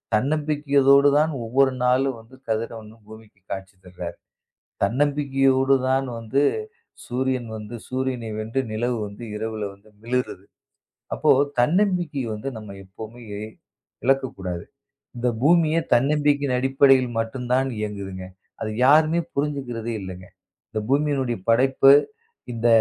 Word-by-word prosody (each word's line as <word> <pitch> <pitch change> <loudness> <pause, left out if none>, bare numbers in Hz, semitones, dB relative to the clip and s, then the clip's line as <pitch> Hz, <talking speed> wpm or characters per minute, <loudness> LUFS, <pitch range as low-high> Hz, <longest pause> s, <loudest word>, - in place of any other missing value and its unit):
தன்னம்பிக்கையோடு 145 +1 +3
தான் 155 +1 +1
ஒவ்வொரு 130 +3 +3
நாளும் 130 +1 +2
வந்து 115 +4 -16
கதிரவனும் 110 0 -4
பூமிக்கு 110 -2 -15
காட்சி 95 0 -6
தர்றாரு. 90 -1 -7 0.7
தன்னம்பிக்கையோடு 135 +2 +2
தான் 135 +1 +1
வந்து 115 +5 0 0.6
சூரியன் 125 -1 -1
வந்து 110 +2 -8
சூரியனை 130 -3 -2
வென்று 115 +5 -1
நிலவு 120 +2 -1
வந்து 100 +3 -9
இரவுல 110 -1 -3
வந்து 100 +2 -23 0.2
மிளிருது. 120 -6 -2 0.7
அப்போ - - +2 0.3
தன்னம்பிக்கை 175 -2 +1
வந்து 105 +6 -5
நம்ம 105 -2 -9
எப்பவுமே 110 +5 -10 0.8
இழக்கக் 135 0 +1
கூடாது. 90 -3 -4 0.5
இந்த 120 +1 -1 0.2
பூமியே 165 +1 +4
தன்னம்பிக்கையின் 145 0 +2
அடிப்படையில் 135 -1 +4
மட்டும்தான் 125 +3 -1
இயங்குதுங்க. 100 -3 -5 0.3
அது 110 - -2
யாருமே 155 +4 +5
புரிஞ்சிக்கிறதே 130 -6 -3
இல்லைங்க. 95 -1 -8 0.4
இந்த 110 - -3
பூமியின் 135 -7 0
படைப்பு, 135 +3 +5 0.6
இந்த 115 0 0
125 Hz, 110 wpm, -23 LUFS, 110-140 Hz, 0.8 s, யாருமே